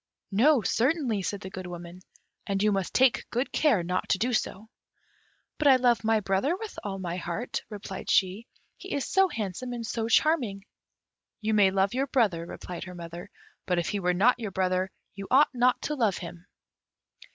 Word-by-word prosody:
"No, 245 Hz, +5 st, +4 dB
certainly," 250 Hz, -, +1 dB
said 200 Hz, +2 st, -3 dB
the 190 Hz, -, -8 dB
Good 185 Hz, -1 st, -7 dB
Woman, 175 Hz, 0 st, -8 dB, 0.5 s
"and 195 Hz, 0 st, 0 dB
you 210 Hz, -, +4 dB
must 195 Hz, -3 st, -1 dB
take 260 Hz, -2 st, +3 dB
good 245 Hz, +3 st, -2 dB
care 255 Hz, -, +2 dB
not 180 Hz, +2 st, -2 dB
to -, -, +3 dB
do 245 Hz, +5 st, 0 dB
so." 215 Hz, -1 st, -2 dB, 0.9 s
"But 300 Hz, -, +3 dB
I 270 Hz, -, +8 dB
love 245 Hz, -2 st, +2 dB
my 220 Hz, 0 st, +3 dB
brother 200 Hz, -, 0 dB
with 440 Hz, +1 st, -7 dB
all 195 Hz, -2 st, -4 dB
my 175 Hz, -2 st, -4 dB
heart," 180 Hz, +7 st, -3 dB
replied 205 Hz, -3 st, -7 dB
she; 195 Hz, +4 st, +2 dB, 0.3 s
"he -, -, -5 dB
is 280 Hz, -, -1 dB
so 385 Hz, 0 st, +4 dB
handsome 230 Hz, -, -4 dB
and 235 Hz, -1 st, -5 dB
so 225 Hz, 0 st, -2 dB
charming." 230 Hz, -8 st, +2 dB, 0.7 s
"You 220 Hz, -1 st, -1 dB
may 205 Hz, -2 st, +5 dB
love 195 Hz, +2 st, +1 dB
your 270 Hz, +2 st, 0 dB
brother," 200 Hz, -10 st, +1 dB
replied 180 Hz, +1 st, -7 dB
her 180 Hz, -1 st, -9 dB
mother; 170 Hz, 0 st, -8 dB, 0.4 s
"but 180 Hz, -, +1 dB
if 170 Hz, -, 0 dB
he 205 Hz, -, -1 dB
were 180 Hz, -1 st, +1 dB
not 240 Hz, +7 st, +4 dB
your 220 Hz, -3 st, -3 dB
brother 185 Hz, 0 st, 0 dB, 0.2 s
you 195 Hz, 0 st, -8 dB
ought 275 Hz, +3 st, +5 dB
not 250 Hz, 0 st, +3 dB
to 300 Hz, -, -1 dB
love 225 Hz, -9 st, +1 dB
him." 175 Hz, 0 st, -9 dB
205 Hz, 190 wpm, -27 LUFS, 185-245 Hz, 0.9 s, I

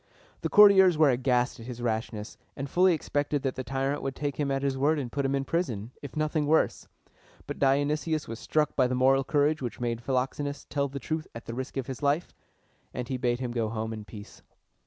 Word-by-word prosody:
The -, -, -1 dB
courtiers 190 Hz, -4 st, +7 dB
were 150 Hz, -3 st, +5 dB
aghast 125 Hz, 0 st, +1 dB
at 115 Hz, -, -10 dB
his 125 Hz, -2 st, -7 dB
rashness, 110 Hz, -2 st, -3 dB, 0.2 s
and 140 Hz, 0 st, -4 dB
fully 180 Hz, +4 st, +4 dB
expected 145 Hz, -1 st, -1 dB
that 135 Hz, -2 st, 0 dB
the 130 Hz, -, -5 dB
tyrant 135 Hz, +2 st, -2 dB
would 135 Hz, -1 st, -3 dB
take 145 Hz, -2 st, -3 dB
him 145 Hz, -2 st, 0 dB
at 135 Hz, 0 st, -1 dB
his 135 Hz, -1 st, 0 dB
word 145 Hz, +4 st, +2 dB
and 130 Hz, -5 st, -4 dB
put 140 Hz, +2 st, -1 dB
him 135 Hz, 0 st, +1 dB
in 135 Hz, 0 st, -1 dB
prison, 125 Hz, -, -2 dB
if 140 Hz, -, -9 dB
nothing 155 Hz, -1 st, 0 dB
worse; 160 Hz, +2 st, +2 dB, 0.6 s
but -, -, -6 dB
Dionysius 145 Hz, +3 st, +1 dB
was 115 Hz, 0 st, -6 dB
struck 150 Hz, -1 st, 0 dB
by 130 Hz, -2 st, +3 dB
the 125 Hz, -, -1 dB
moral 135 Hz, +1 st, +4 dB
courage 145 Hz, +2 st, +1 dB
which 120 Hz, -3 st, -5 dB
made 120 Hz, -1 st, -2 dB
Philoxenus 135 Hz, +3 st, -2 dB
tell 140 Hz, -1 st, -1 dB
the 140 Hz, 0 st, -7 dB
truth 155 Hz, +4 st, -3 dB
at 115 Hz, -, -8 dB
the 115 Hz, -, -6 dB
risk 130 Hz, +3 st, -5 dB
of 135 Hz, -, -2 dB
his 130 Hz, -1 st, -7 dB
life, 145 Hz, +4 st, 0 dB, 0.6 s
and 125 Hz, -1 st, -4 dB
he 130 Hz, -, -1 dB
bade 120 Hz, -1 st, 0 dB
him 125 Hz, -2 st, -2 dB
go 115 Hz, -2 st, -1 dB
home 110 Hz, 0 st, -3 dB
in 110 Hz, -1 st, -7 dB
peace. 105 Hz, 0 st, -12 dB
135 Hz, 220 wpm, -28 LUFS, 125-145 Hz, 0.6 s, courtiers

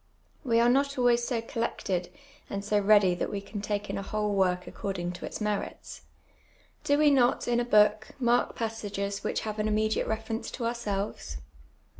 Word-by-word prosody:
We 230 Hz, -4 st, +3 dB
ai'e 235 Hz, -, +5 dB
not 280 Hz, +3 st, +2 dB
always 240 Hz, -1 st, +3 dB
so 235 Hz, -3 st, -1 dB
collected 195 Hz, -6 st, -2 dB, 0.4 s
and 200 Hz, 0 st, -4 dB
so 210 Hz, 0 st, +2 dB
ready 205 Hz, -2 st, +5 dB
that 175 Hz, -, -2 dB
we 205 Hz, -, -3 dB
can 200 Hz, +1 st, -7 dB
take 205 Hz, 0 st, -2 dB
in -, -, -3 dB
a -, -, -3 dB
whole 210 Hz, +1 st, -1 dB
work 180 Hz, -2 st, +1 dB
according 185 Hz, -4 st, -4 dB
to 175 Hz, -, -7 dB
its -, -, -6 dB
merits. 210 Hz, -2 st, -4 dB, 0.8 s
Do 285 Hz, -, +3 dB
we 300 Hz, -1 st, +5 dB
not, 255 Hz, -3 st, +3 dB
in 240 Hz, 0 st, +2 dB
a -, -, +1 dB
book, 215 Hz, -1 st, +3 dB
mark 240 Hz, -1 st, +2 dB
passages 205 Hz, -3 st, -3 dB
which -, -, -1 dB
have 215 Hz, -1 st, -4 dB
an 210 Hz, -, +1 dB
immediate 215 Hz, +1 st, +1 dB
reference 220 Hz, +1 st, -3 dB
to 235 Hz, -, -3 dB
ourselves 205 Hz, -, -3 dB
215 Hz, 180 wpm, -28 LUFS, 200-235 Hz, 0.8 s, ai'e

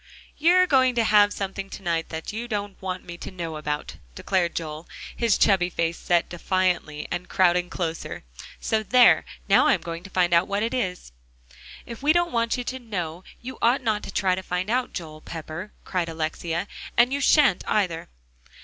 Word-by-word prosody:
"You're 355 Hz, +4 st, +5 dB
going 260 Hz, -6 st, +3 dB
to 235 Hz, -, +3 dB
have 210 Hz, -1 st, +5 dB
something 195 Hz, 0 st, -4 dB
to 195 Hz, -, -9 dB
night 165 Hz, -2 st, -1 dB
that 160 Hz, +5 st, -5 dB
you 235 Hz, +2 st, -4 dB
don't 205 Hz, -3 st, -4 dB
want 185 Hz, -1 st, -4 dB
me 175 Hz, 0 st, -9 dB
to -, -, -6 dB
know 170 Hz, -4 st, -5 dB
about," 150 Hz, -1 st, -4 dB, 0.2 s
declared 180 Hz, -3 st, 0 dB
Joel, 155 Hz, 0 st, -5 dB, 0.3 s
his 230 Hz, -4 st, +2 dB
chubby 185 Hz, -3 st, +3 dB
face 170 Hz, -1 st, -2 dB
set 175 Hz, -1 st, +1 dB
defiantly, 175 Hz, -4 st, -1 dB
and 180 Hz, 0 st, -4 dB
crowding 180 Hz, -1 st, +3 dB
closer; 165 Hz, -2 st, -4 dB, 0.4 s
"so 220 Hz, -1 st, 0 dB
there; 245 Hz, +3 st, +5 dB, 0.2 s
now -, -, +5 dB
I'm -, -, +3 dB
going 170 Hz, 0 st, -6 dB
to 195 Hz, -, -11 dB
find 180 Hz, -2 st, +1 dB
out 170 Hz, +1 st, +4 dB
what 200 Hz, +1 st, -1 dB
it 230 Hz, -, -1 dB
is." 185 Hz, -, -3 dB, 0.7 s
"If 235 Hz, +1 st, -9 dB
we 295 Hz, +2 st, +4 dB
don't 345 Hz, 0 st, +2 dB
want 230 Hz, 0 st, 0 dB
you 245 Hz, -, -3 dB
to 260 Hz, +1 st, -4 dB
know, 180 Hz, -7 st, -5 dB, 0.2 s
you 260 Hz, +2 st, -7 dB
ought 245 Hz, +3 st, +3 dB
not 215 Hz, -3 st, 0 dB
to -, -, -7 dB
try 190 Hz, -2 st, +1 dB
to 185 Hz, -, -2 dB
find 180 Hz, +2 st, -2 dB
out, 250 Hz, +1 st, 0 dB
Joel 155 Hz, -3 st, -7 dB
Pepper," 165 Hz, +5 st, -7 dB
cried 180 Hz, -3 st, -1 dB
Alexia. 165 Hz, +3 st, -3 dB, 0.3 s
"And 245 Hz, +2 st, +5 dB
you 280 Hz, -, -1 dB
shan't, 280 Hz, -, +4 dB
either." 180 Hz, -6 st, 0 dB
185 Hz, 190 wpm, -25 LUFS, 170-230 Hz, 0.7 s, You're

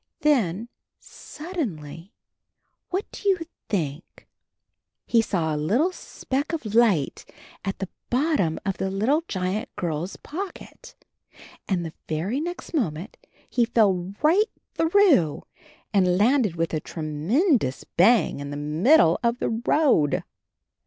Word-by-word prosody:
Then 230 Hz, -, +2 dB, 0.2 s
— -, -, -61 dB
suddenly, 200 Hz, -, -7 dB, 0.8 s
what 380 Hz, +3 st, -1 dB
do 410 Hz, -, -2 dB
you 375 Hz, -3 st, +2 dB, 0.3 s
think? 160 Hz, -5 st, -4 dB, 0.8 s
He 230 Hz, -, +4 dB
saw 170 Hz, -7 st, -1 dB
a -, -, -1 dB
little 220 Hz, -, +1 dB
speck 285 Hz, -3 st, -4 dB
of 230 Hz, -11 st, -4 dB
light 215 Hz, -11 st, +3 dB, 0.4 s
at 195 Hz, 0 st, -3 dB
the 195 Hz, -, -4 dB, 0.2 s
bottom 255 Hz, -, +1 dB
of 195 Hz, -2 st, -1 dB
the 190 Hz, -, -1 dB
little 220 Hz, +11 st, +1 dB
giant 185 Hz, +3 st, -2 dB
girl's 170 Hz, +1 st, -3 dB
pocket. 370 Hz, +5 st, -8 dB, 0.7 s
And 180 Hz, -3 st, 0 dB
the 160 Hz, -, -6 dB, 0.2 s
very 175 Hz, -, -1 dB
next 350 Hz, +2 st, -6 dB
moment 190 Hz, -, -2 dB, 0.3 s
he 245 Hz, -, +1 dB
fell 200 Hz, -5 st, +1 dB
right 385 Hz, +8 st, +4 dB, 0.2 s
through 325 Hz, -, +3 dB, 0.5 s
and 180 Hz, -3 st, +3 dB
landed 225 Hz, -, +3 dB
with 165 Hz, 0 st, -1 dB
a 155 Hz, -, +1 dB
tremendous 160 Hz, -, 0 dB
bang 205 Hz, -1 st, +3 dB
in 140 Hz, 0 st, -6 dB
the 145 Hz, -, -5 dB
mid 160 Hz, -, +4 dB
dle 165 Hz, -, +4 dB
of 235 Hz, 0 st, +1 dB
the -, -, -1 dB
road. 230 Hz, -, +2 dB
205 Hz, 130 wpm, -25 LUFS, -, 0.8 s, He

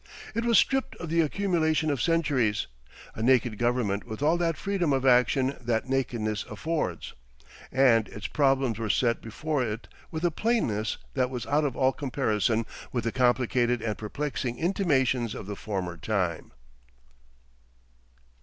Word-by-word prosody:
It 230 Hz, +2 st, -1 dB
was 235 Hz, -1 st, +5 dB
stripped 270 Hz, -1 st, +2 dB
of 170 Hz, -, -7 dB
the 165 Hz, 0 st, +4 dB
accumulation 160 Hz, -2 st, +1 dB
of 135 Hz, -5 st, -1 dB
centuries, 145 Hz, -10 st, +1 dB, 0.5 s
a -, -, -6 dB
naked 120 Hz, -2 st, +2 dB
government 120 Hz, -4 st, 0 dB
with 115 Hz, +3 st, -6 dB
all 155 Hz, +3 st, +4 dB
that 165 Hz, -2 st, 0 dB
freedom 185 Hz, -7 st, 0 dB
of 135 Hz, 0 st, 0 dB
action 130 Hz, +2 st, +3 dB
that 120 Hz, 0 st, -1 dB
nakedness 115 Hz, -5 st, -1 dB
affords. 155 Hz, +10 st, -3 dB, 0.6 s
And 125 Hz, -5 st, +4 dB
its 105 Hz, -1 st, -9 dB
problems 135 Hz, -4 st, +1 dB
were 110 Hz, -2 st, -2 dB
set 115 Hz, +3 st, +2 dB
before 145 Hz, +5 st, -2 dB
it 110 Hz, 0 st, -4 dB, 0.2 s
with 160 Hz, +2 st, -3 dB
a 175 Hz, -, +2 dB
plainness 135 Hz, -, 0 dB, 0.2 s
that 130 Hz, -2 st, +1 dB
was 125 Hz, -2 st, -5 dB
out 150 Hz, +1 st, +2 dB
of 135 Hz, -4 st, -2 dB
all 130 Hz, 0 st, +3 dB
comparison 115 Hz, -5 st, 0 dB, 0.3 s
with 120 Hz, -3 st, -1 dB
the 115 Hz, -, -1 dB
complicated 125 Hz, -1 st, +2 dB
and 110 Hz, -2 st, -1 dB
perplexing 120 Hz, +1 st, -3 dB
intimations 135 Hz, -, +1 dB
of -, -, -7 dB
the 100 Hz, +1 st, -5 dB
former 95 Hz, -5 st, -4 dB
time. 90 Hz, -3 st, -2 dB
125 Hz, 150 wpm, -27 LUFS, 110-150 Hz, 0.6 s, was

